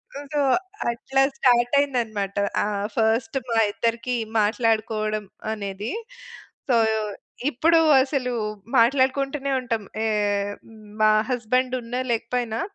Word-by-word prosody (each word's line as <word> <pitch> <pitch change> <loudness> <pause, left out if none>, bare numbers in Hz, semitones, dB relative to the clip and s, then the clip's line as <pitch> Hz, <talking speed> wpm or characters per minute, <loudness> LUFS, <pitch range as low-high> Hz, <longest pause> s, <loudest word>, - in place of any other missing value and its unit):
హ్మ్, 285 0 -7
సో, 290 - +2 0.5
అట్లా 270 +3 0 0.2
స్టార్టయిందనమాట. 240 -5 +2 0.3
ఆహ్, 205 0 -2
ఫస్టు 225 +3 +1
మా 230 - +1 0.2
ఇద్దరికీ 235 +2 -1 0.3
మాట్లాడుకోవడం 215 -1 0 0.3
అనేది. 200 - -5 0.8
సో, 240 - +4 0.7
ఇప్పుడు 325 +6 +4 0.2
అసలు 265 -3 -2 0.5
మాట్లాడుకుంటూనే 275 +3 +2
ఉంటాం. 230 -4 -2 0.2
ఏహ్, 205 -1 0
హ్మ్, 220 -1 -15 0.2
మా 215 - +6 0.2
హస్బెండున్నా, 250 +1 -1
లేకపోయినా 230 0 -2
235 Hz, 95 wpm, -24 LUFS, 215-255 Hz, 0.8 s, మా